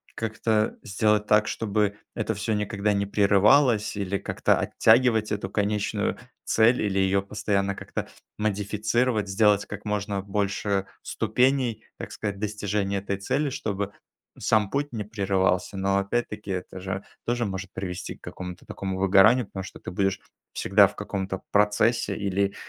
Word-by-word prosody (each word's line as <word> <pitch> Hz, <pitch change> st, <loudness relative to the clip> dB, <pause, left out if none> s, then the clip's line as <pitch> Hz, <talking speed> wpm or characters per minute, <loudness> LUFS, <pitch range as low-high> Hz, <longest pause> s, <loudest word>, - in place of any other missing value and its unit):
как-то 110 Hz, -1 st, 0 dB
сделать 105 Hz, -1 st, +1 dB
так, 105 Hz, 0 st, +4 dB
чтобы 105 Hz, -2 st, 0 dB, 0.2 s
это 110 Hz, 0 st, -1 dB
всё 110 Hz, +2 st, -2 dB
никогда 105 Hz, 0 st, 0 dB
не 100 Hz, 0 st, 0 dB
прерывалось, 105 Hz, +4 st, +4 dB
или 100 Hz, -1 st, -1 dB
как-то -, -, +1 dB
оттягивать 110 Hz, -1 st, +3 dB
эту 100 Hz, -2 st, -2 dB
конечную 105 Hz, 0 st, -1 dB, 0.3 s
цель, 115 Hz, +3 st, +3 dB
или 100 Hz, -2 st, 0 dB
её 95 Hz, +1 st, +2 dB
постоянно 100 Hz, 0 st, -1 dB
как-то -, -, -5 dB, 0.3 s
модифицировать, 105 Hz, +2 st, 0 dB
сделать 100 Hz, +1 st, +3 dB
как 105 Hz, +1 st, -8 dB
можно 100 Hz, -1 st, -2 dB
больше 100 Hz, 0 st, -1 dB, 0.2 s
ступеней, 125 Hz, -3 st, +1 dB
так -, -, -7 dB
сказать, 100 Hz, -2 st, -4 dB
достижения 105 Hz, -1 st, -1 dB
этой 100 Hz, 0 st, -3 dB
цели, 140 Hz, +9 st, -1 dB
чтобы 100 Hz, -6 st, -3 dB, 0.5 s
сам 105 Hz, -2 st, +2 dB
путь 145 Hz, +1 st, -1 dB
не 110 Hz, -, -3 dB
прерывался. 95 Hz, -2 st, 0 dB
Но, 95 Hz, +1 st, +1 dB
опять-таки, 105 Hz, 0 st, -3 dB
это 95 Hz, 0 st, -5 dB
же 95 Hz, +1 st, -4 dB, 0.2 s
тоже 120 Hz, -1 st, 0 dB
может 95 Hz, -1 st, -5 dB
привести 90 Hz, -2 st, -5 dB
к -, -, -25 dB
какому-то 90 Hz, -1 st, -8 dB
такому 95 Hz, -1 st, -4 dB
выгоранию, 100 Hz, +5 st, +5 dB
потому 95 Hz, -, -6 dB
что 95 Hz, -, -10 dB
ты -, -, -7 dB
будешь 95 Hz, +1 st, 0 dB, 0.3 s
всегда 100 Hz, 0 st, +5 dB
в -, -, -12 dB
каком-то 95 Hz, -2 st, -4 dB
процессе 105 Hz, +3 st, +2 dB
или, 100 Hz, -1 st, 0 dB
100 Hz, 145 wpm, -26 LUFS, 95-110 Hz, 0.5 s, выгоранию